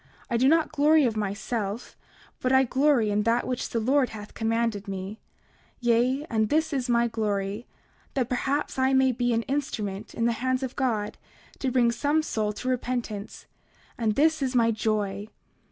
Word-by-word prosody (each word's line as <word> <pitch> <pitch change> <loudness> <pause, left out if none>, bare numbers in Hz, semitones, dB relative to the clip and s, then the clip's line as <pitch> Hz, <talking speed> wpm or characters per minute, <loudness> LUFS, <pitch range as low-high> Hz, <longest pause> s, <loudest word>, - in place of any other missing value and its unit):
I 235 - +2
do 255 +3 +4
not 320 +2 +3
glory 305 0 +4
of 230 -3 0
myself, 205 +1 -3 0.4
but 255 - 0
I 265 0 +6
glory 260 -4 +2
in 205 +1 +2
that 230 +3 +1
which 250 -1 -3
the 230 - -1
Lord 260 +3 +2
hath 210 -1 -9
commanded 225 -2 -1
me; 195 +2 -5 0.6
yea, 245 +4 +2
and 220 -2 0
this 315 +1 +1
is 260 -2 -1
my 235 0 +3
glory, 210 -1 -2 0.5
that 255 -4 +1
perhaps 270 +3 -1
I 260 +1 +3
may 265 0 +4
be 245 0 0
an 230 0 +1
instrument 220 -8 -3
in 230 - 0
the 235 - +3
hands 255 +1 0
of 260 -1 -4
God 220 -6 -1 0.4
to 265 - 0
bring 240 -2 +3
some 290 +6 +1
soul 215 -8 -1
to 230 +4 -7
repentance; 240 -4 -3 0.5
and 220 -3 0
this 315 +1 +3
is 260 -1 -1
my 230 -1 +4
joy. 210 -2 -1
235 Hz, 175 wpm, -26 LUFS, 215-265 Hz, 0.6 s, I